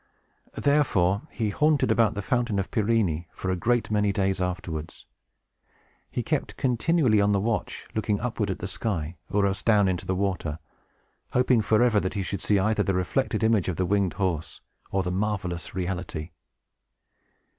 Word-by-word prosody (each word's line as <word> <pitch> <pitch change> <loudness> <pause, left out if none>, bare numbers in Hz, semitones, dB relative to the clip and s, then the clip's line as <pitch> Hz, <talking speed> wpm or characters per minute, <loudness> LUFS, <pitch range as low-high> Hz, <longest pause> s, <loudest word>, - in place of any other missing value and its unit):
Therefore, 105 -10 +2
he 110 -3 -2
haunted 150 +6 +2
about 115 -2 +3
the 100 - -3
Fountain 120 -2 0
of 100 - -2
Pirene 100 -7 +1
for 95 - -2
a - - +1
great 120 +5 0
many 105 -1 +2
days 95 -1 0
afterwards. 85 -3 -4 1.0
He 120 - -3
kept 155 0 -2
continually 125 -2 +2
on 100 0 +3
the 100 - +2
watch, 110 +2 -2
looking 105 -2 0
upward 110 -3 -2
at 95 - -2
the 90 - -5
sky, 90 -6 -3
or 100 +1 +2
else 100 +1 -1
down 105 -4 +4
into 90 -2 -2
the 95 - 0
water, 90 -6 -1 0.8
hoping 125 -2 +4
forever 110 +1 +3
that 95 +1 -3
he 100 - -1
should 95 0 -4
see 105 - +2
either 110 +3 +2
the 95 - 0
reflected 110 +5 0
image 110 -4 +3
of 90 - -1
the 90 - 0
winged 100 -1 +1
horse, 90 -5 -2 0.3
or 95 -1 0
the 90 - -2
marvelous 95 -4 -2
reality. 90 -3 -4
100 Hz, 165 wpm, -26 LUFS, 90-110 Hz, 1.0 s, down